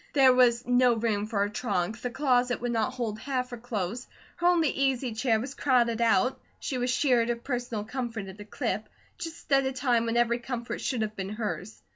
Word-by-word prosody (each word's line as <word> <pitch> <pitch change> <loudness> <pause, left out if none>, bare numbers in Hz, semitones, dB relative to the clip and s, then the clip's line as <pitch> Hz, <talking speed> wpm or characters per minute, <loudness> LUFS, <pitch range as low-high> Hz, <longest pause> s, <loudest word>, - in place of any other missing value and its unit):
There 265 -3 +6
was 245 -1 +4
no 245 -1 +4
room 215 -2 0
for 210 -2 -1
her 205 - +1
trunk; 210 -1 -2
the 250 - -2
closet 250 -1 +1
would 245 0 -2
not 235 +2 0
hold 225 -4 -3
half 255 -3 -2
her 245 - -5
clothes; 230 0 -4 0.3
her 345 0 +2
only 340 -4 +4
easy 265 -3 0
chair 225 0 +1
was 250 +5 -5
crowded 235 -4 +2
out; 235 +3 +3 0.2
she 255 - -3
was 245 +1 0
sheared 250 -3 +2
of 235 0 -2
personal 245 -5 -3
comfort 235 -2 -4
at 190 +1 -10
a - - -8
clip, - - -3 0.3
just 330 -3 -8
at 275 0 +5
a 265 - 0
time 245 -3 +1
when 230 +1 0
every 240 0 +2
comfort 240 -1 -5
should 245 -5 -1
have 215 0 -4
been 195 -1 -4
hers. 210 - -5
240 Hz, 210 wpm, -28 LUFS, 220-255 Hz, 0.3 s, There